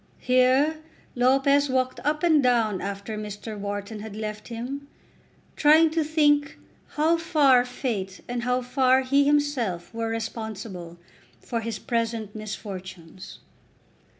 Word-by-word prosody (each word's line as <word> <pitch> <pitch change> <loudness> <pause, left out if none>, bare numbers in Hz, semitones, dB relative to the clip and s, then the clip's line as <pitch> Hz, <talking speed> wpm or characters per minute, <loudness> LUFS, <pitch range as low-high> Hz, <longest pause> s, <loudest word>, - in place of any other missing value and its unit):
Here 255 +5 +3 0.4
Lopez 275 +3 +3
walked 255 0 0
up 300 +2 -1
and 315 -4 +5
down 230 -6 +2
after 200 +2 -5
Mr. 210 +1 -7
Wharton 205 +1 -5
had 210 -1 -8
left 215 -1 -5
him, 255 +5 -6 0.7
trying 315 +2 +5
to 320 0 +1
think 295 -2 +2 0.4
how 320 +3 +3
far 290 -7 +4
Fate 230 -7 -4
and 245 0 -3
how 250 +1 0
far 260 +1 +3
he 275 +2 +3
himself 280 -13 0
were 225 0 -2
responsible 220 -6 -6 0.4
for 235 - -3
his 225 -1 -4
present 230 -2 -2
misfortunes. 190 -5 -8
245 Hz, 125 wpm, -25 LUFS, 215-280 Hz, 0.7 s, and